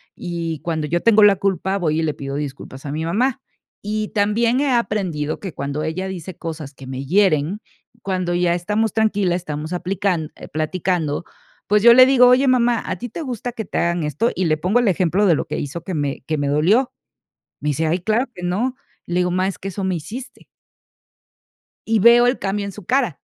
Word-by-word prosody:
Y, 170 -3 -4
cuando 160 -3 -2
yo 170 +3 0
tengo 220 -2 +5
la 205 -1 +7
culpa, 190 0 0
voy 160 -4 0
y - - 0
le 155 -2 0
pido 135 -1 -6
disculpas 140 -1 -6
a 140 - -4
mi 155 +2 -3
mamá. 235 +10 0 0.4
Y 215 +1 -3
también 230 +4 +1
he 285 -2 +1
aprendido 185 -11 -1
que 190 -5 -6
cuando 140 +2 -3
ella 165 +5 -3
dice 185 -2 -7
cosas 155 -4 -6
que 135 -1 -12
me 130 +1 -5
hieren, 185 +2 +2 0.4
cuando 185 -3 -2
ya 175 0 +2
estamos 210 +5 -1
tranquilas, 205 -5 +1
estamos 155 0 -5
aplican 180 -3 -1 0.2
platicando, 160 0 -1 0.4
pues, 210 0 +3
yo 235 0 +9
le 255 +1 +9
digo: 255 -2 +6
"Oye, 255 +2 +5
mamá, 240 -2 +3
¿a - - -3
ti 245 - -6
te 330 - -6
gusta 245 -4 -4
que 220 -2 -5
te - - -5
hagan 170 -1 0
esto?". 150 - 0
Y 185 - 0
le 155 -1 +2
pongo 185 +9 +1
el 240 - +1
ejemplo 185 +2 +2
de 175 -5 +5
lo - - -2
que - - -4
hizo 145 +4 -5
que 185 - -5
me 145 -3 -2
que 155 - -1
me 145 -1 -1
dolió. 180 - +2 0.7
Me 150 - -1
dice: 150 +3 0
"Ay, 170 +4 +1
claro 220 +8 0
que 180 - -10
no". 215 +9 -1 0.3
Le 175 - -4
digo: 180 0 0
"Mamá, 185 +1 +1
es 195 - -4
que 195 - -6
eso 195 +1 -5
me 190 -1 0
hiciste". 245 - -8 1.4
Y 220 0 +2
veo 235 +3 +6
el 245 - +1
cambio 200 +1 -2
en 200 - -5
su 200 -1 -12
cara. 245 - 0
185 Hz, 210 wpm, -20 LUFS, 160-215 Hz, 1.4 s, yo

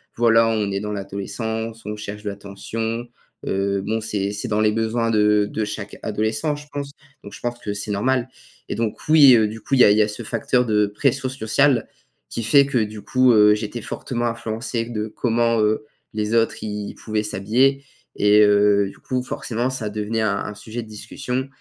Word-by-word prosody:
voilà 115 -1 +4
on 110 -3 0
est 100 - -1
dans 105 +1 -4
l'adolescence, 110 +3 -4
on 105 0 -4
cherche 105 0 -7
de 105 - -2
l'attention, 110 +4 -5 0.4
heu, 100 0 0
bon, 110 +2 -1
c'est 100 -2 -2
c'est 105 +4 -5
dans 105 -1 0
les 105 0 +3
besoins 115 +1 0
de 105 -1 +3
de 110 - -3
chaque 105 0 -6
adolescent, 110 +7 -1
je 145 0 -10
pense. 140 -1 -4 0.3
Donc 100 - -10
je - - -9
pense 120 0 -4
que 105 -3 -4
c'est 100 +1 -4
normal. 125 +5 0 0.4
Et - - -3
donc 115 -2 -2
oui, 145 -5 +8
heu, 110 -2 +4
du 110 +1 -8
coup, 135 - 0
il 125 - +5
y - - +10
a - - +7
il 105 - +3
y - - +5
a 105 - +3
ce 105 +3 -6
facteur 125 +3 0
de 105 -2 +2
pression 130 +5 0
sociale, 130 +1 +2 0.4
qui - - -3
fait 140 +5 +5
que 135 -3 0
du 105 -1 -4
coup, 130 +3 +3
heu, 105 -1 +6
j'étais 110 +2 -4
fortement 120 -2 -3
influencé 115 0 -3
de 110 -2 -4
comment, 115 +1 +1
heu, 110 +6 +1 0.3
les 105 +1 -2
autres 115 -1 +1
ils 105 -1 -4
pouvaient 110 -1 -2
s'habiller 125 +7 +1 0.3
et 105 +1 +5
heu, 100 -1 +4
du - - -15
coup 125 -1 -2
forcément, 120 0 -2
ça 120 -5 -4
devenait 105 +2 -2
un 110 -2 +1
un 105 - -5
sujet 110 +3 -6
de 110 - -14
discussion 125 +5 -4
110 Hz, 205 wpm, -22 LUFS, 105-120 Hz, 0.4 s, y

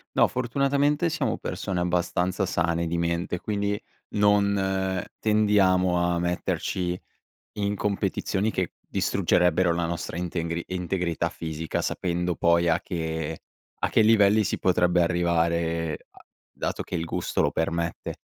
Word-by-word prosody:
No, - - +5
fortunatamente 140 +5 +1
siamo 165 - -1
persone 95 -2 -3
abbastanza 90 +2 0
sane 85 -1 0
di 85 +1 -1
mente, 85 +1 -1
quindi 100 -1 -1 0.4
non 100 -2 +2 0.2
tendiamo 100 -4 +3
a 85 0 +1
metterci 90 +1 -1 0.5
in 100 0 -1
competizioni 100 +1 -1
che 90 -4 -2
distruggerebbero 90 0 +2
la 85 0 0
nostra 85 0 -4
intengri 85 -1 -3
integrità 90 -2 -1
fisica, 80 -1 -4
sapendo 90 -1 -1
poi 85 0 +3
a 80 - +2
che 80 -2 -3 0.4
a - - 0
che - - +4
livelli 105 -1 +5
si 95 - -2
potrebbe 90 -1 +3
arrivare 85 -2 0
a - - -19 0.3
dato - - -3
che - - -5
il 85 -1 -2
gusto - - -1
lo - - +2
permette. 85 0 -2
90 Hz, 130 wpm, -26 LUFS, 85-100 Hz, 0.5 s, No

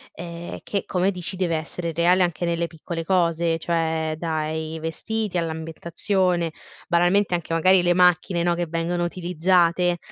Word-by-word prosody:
ehm, 170 0 -7
che, 200 - -2
come 185 +1 +1
dici, 185 0 -5
deve 175 -3 0
essere 165 +1 -3
reale 175 +3 +4
anche 175 -1 -2
nelle 170 0 0
piccole 165 +1 -6
cose, 170 -2 +1
cioè 160 -1 -1
dai 160 -1 -3
vestiti 205 +5 -3
all'ambientazione, 170 +2 0 0.4
banalmente 175 +2 +3
anche 165 -1 -4
magari 185 +3 +5
le 175 0 +3
macchine, 180 0 +3
no, 175 0 +2
che 175 0 -1
vengono 170 +2 -1
utilizzate. 175 0 +2
170 Hz, 140 wpm, -23 LUFS, 165-180 Hz, 0.4 s, magari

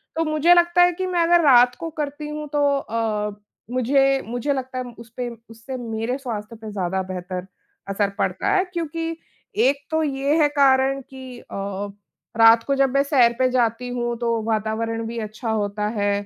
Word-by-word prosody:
तो 325 - +1
मुझे 310 +3 +4
लगता 345 0 +4
है 355 0 +6
कि 370 +2 -3
मैं 350 -2 +1
अगर 345 0 +4
रात 250 -3 +6
को 330 0 -4
करती 295 +1 -4
हूँ 300 0 -5
तो 290 -1 +2
अ, 215 -4 -2 0.4
मुझे 270 +2 +2
मुझे 245 +5 -1
लगता 260 -1 -5
है - - -2 0.2
उसपे 235 +1 -6 0.2
उससे 230 +4 -8
मेरे 230 +1 -3
स्वास्थ्य 230 -4 -6
पे 220 -1 -9
ज़्यादा 190 -1 -1
बेहतर 185 0 -5 0.4
असर 195 0 0
पड़ता - - -1
है 375 - +3
क्योंकि 330 0 -3 0.5
एक 280 +1 0
तो 315 0 +1
ये 280 +1 0
है 295 - +5
कारण 270 -1 +3
कि 260 -1 -11
अ, - - -18 0.9
रात 225 0 +7
को 275 - 0
जब 275 0 +3
मैं 275 - +4
सैर 255 -5 +4
पे 255 0 +3
जाती 245 -1 0
हूँ 240 -1 -2
तो 230 -1 0
वातावरण 225 +1 -2
भी 235 +1 -6
अच्छा 215 +2 -5
होता 210 -1 -1
है 205 0 +1
250 Hz, 180 wpm, -22 LUFS, 225-285 Hz, 0.9 s, रात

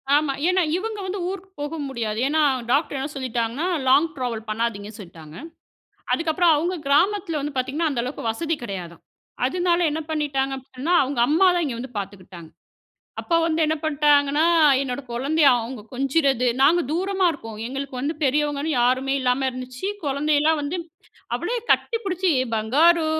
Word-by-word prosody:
ஆமா. 295 -2 +2 0.2
ஏன்னா 370 0 +3 0.2
இவங்க 430 +1 -4
வந்து 380 +1 -4
ஊருக்குப் 385 -1 -8
போக 305 +3 -4
முடியாது. 225 -4 -3
ஏன்னா 310 +2 +2 0.3
டாக்டர் 285 0 +1
என்ன 275 +3 -3
சொல்லிட்டாங்கன்னா, 250 +4 -2 0.2
லாங் 285 +5 +5
டிராவல் 235 -4 -4
பண்ணாதீங்கன்னு 215 -1 -3
சொல்லிட்டாங்க. 165 -4 -12 0.8
அதுக்கப்புறோ 335 +1 +1
அவங்க 345 +5 -1
கிராமத்துல 340 +2 +2
வந்து 290 -1 -5
பாத்தீங்கன்னா 285 +6 0
அந்த 240 -3 -1
அளவுக்கு 255 0 -6
வசதி 325 +7 -2
கிடையாதா. 180 -6 -6 0.5
அதனால 350 +4 +1
என்ன 315 - -2
பண்ணிட்டாங்க 275 -3 -1
அப்டின்னா 265 +6 -4
அவங்க 265 -2 -2
அம்மாதா 355 +3 +4
இங்க 250 -4 -3
வந்து 250 -2 -8
பாத்துக்கிட்டாங்க. 185 -4 -8 0.7
அப்ப 335 - 0
வந்து 325 0 0
என்ன 315 +1 0
பண்ட்டாங்கன்னா 290 0 +3 0.4
என்னோட 270 +1 -3
குழந்தைய 285 +5 +2
அவங்க 230 0 -6
கொஞ்சறது. 270 -1 +1
நாங்க 340 +5 +5
தூரமா 380 +2 0
இருக்கோ. 225 -7 -9 0.2
எங்களுக்கு 270 0 -5
வந்து 300 +4 -1
பெரியவங்கன்னு 295 +2 0
யாருமே 260 +2 +2
இல்லாம 255 +1 +1
இருந்துச்சு. 255 +7 -6 0.2
குழந்தையெல்லா 295 +2 +2
வந்து 300 +6 -3 0.6
அவளே - - -2 0.2
கட்டிப்புடிச்சு 380 -6 0 0.3
"பங்காரு" 315 +10 +3
285 Hz, 140 wpm, -23 LUFS, 250-330 Hz, 0.8 s, லாங்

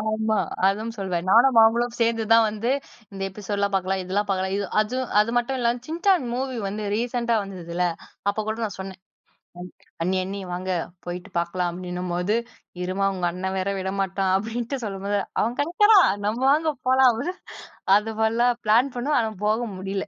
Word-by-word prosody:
ஆமா. 220 0 0 0.3
அதுவும் 215 +4 0
சொல்வேன். 185 -2 -2
நானும் 235 +2 +6
அவங்களும் 235 +2 +3
சேர்ந்து 230 -1 +2
தான் 230 0 +7
வந்து, 220 +4 -2 0.4
"இந்த 195 0 -6
எபிசோடுலாம் 200 0 -2
பார்க்கலாம். 190 0 0
இதெல்லாம் 200 +3 -1
பார்க்கலாம்." 190 0 0
இது 200 -1 -2
அது 215 +4 -1 0.2
அது 215 - +1
மட்டும் 255 +2 -2
இல்லாம 240 +1 +1
சின்சான் 345 -1 +2
மூவி 260 0 -2
வந்து 210 +2 -4
ரீசென்ட்டா 235 0 0
வந்ததுல்ல, 180 -2 -3 0.4
அப்போ 205 +2 0
கூட 220 - -1
நான் 205 -2 -4
சொன்னேன். 190 -1 -7 1.0
"அண்ணி 185 +2 +1
அண்ணி 200 +1 -5
வாங்க 185 +1 -4 0.4
போயிட்டு 180 +3 -6
பார்க்கலாம்." 175 +1 -1
அப்படின்னும்போது, 180 +2 -2 0.5
இரும்மா 190 +2 0
உங்க 180 -2 -1
அண்ணன் 190 +1 -3
வேற 185 - -1
விடமாட்டான் 190 0 -1
அப்படின்ட்டு 235 +5 -4
சொல்லும்போது, 200 0 -2 0.2
அவன் 235 +3 -1
கிடைக்கிறான், 380 - +5 0.2
நம்ம 220 +4 -1
வாங்க 310 +1 +2 0.2
போலாம் 260 -1 +6
அப்படினு, 280 +11 -3 0.6
அது 220 +1 -3
மாறிலா 230 +2 +3 0.2
பிளான் 240 +5 +3
பண்ணுவோம், 290 +5 +1
ஆனால் 220 -3 -4
போக 215 +2 +2 0.2
முடியல 195 +1 -3
210 Hz, 160 wpm, -24 LUFS, 190-235 Hz, 1.0 s, தான்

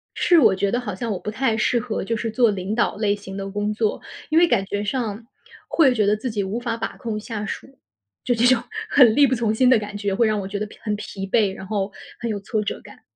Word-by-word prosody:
是 345 - +4
我 245 - +6
觉 195 +1 0
得 240 - 0
好 210 -6 -5
像 230 +4 -4
我 195 - -2
不 210 - -5
太 225 +1 0
适 235 +2 +2
合 230 -4 -3
就 230 +3 -1
是 225 +1 -3
做 235 0 +3
领 195 +1 -3
导 235 - +1
类 205 -1 +1
型 195 -1 -9
的 195 0 -4
工 205 +1 -2
作， 215 0 -1 0.3
因 315 - +4
为 345 - +6
感 235 - +1
觉 205 +1 -3
上， 225 -1 -3 0.4
会 275 -6 +4
觉 215 -4 +2
得 210 +1 +3
自 240 +4 -4
己 210 -3 -2
无 205 +5 -3
法 235 -2 -2
把 - - -5
控 225 -3 -4
下 215 -1 -5
属。 270 +4 -7 0.5
就 250 - +1
这 230 - +2
种 255 -2 +4 0.3
很 240 -6 +6
力 290 - +7
不 260 - +1
从 225 -3 0
心 250 +3 +3
的 255 - +6
感 205 -1 -6
觉 205 -1 -1
会 230 +2 +3
让 215 -1 0
我 195 - -4
觉 200 +2 -4
得 210 - -2
疲 210 - -15
很 210 -2 -1
疲 195 -1 -6
惫， 200 0 +2
然 190 - -9
后 200 -1 -2 0.3
很 235 - -2
有 210 - -2
挫 210 +2 -2
折 205 - -4
感。 - - -15
215 Hz, 290 characters per minute, -22 LUFS, 205-240 Hz, 0.5 s, 力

